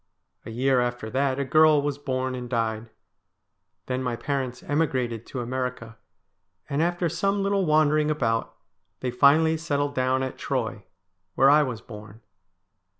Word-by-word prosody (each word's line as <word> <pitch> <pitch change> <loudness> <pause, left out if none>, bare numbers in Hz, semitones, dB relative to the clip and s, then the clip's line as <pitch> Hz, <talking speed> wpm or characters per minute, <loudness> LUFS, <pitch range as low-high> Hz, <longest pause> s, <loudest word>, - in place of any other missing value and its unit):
A - - -6
year 130 +3 +1
after 120 -2 -3
that 135 0 0
a 140 - -1
girl 155 +2 +5
was 145 0 -2
born 130 -2 -2
and 125 -1 -6
died. 115 -2 -2 1.0
Then 130 0 -2
my 125 -2 -2
parents 130 +2 -3
emigrated 130 - -1
to 130 - -5
America, 125 -2 -4 0.7
and 140 +2 -1
after 175 +1 0
some 195 +5 0
little 195 -2 +1
wandering 155 0 +3
about 115 -7 -1 0.5
they 125 - -2
finally 155 +5 +4
settled 145 -3 -1
down 130 0 +1
at 130 - -5
Troy, 110 -6 -3 0.5
where 135 +2 +6
I 150 +1 +6
was 125 -6 -3
born. 105 0 -12
130 Hz, 150 wpm, -25 LUFS, 120-150 Hz, 1.0 s, where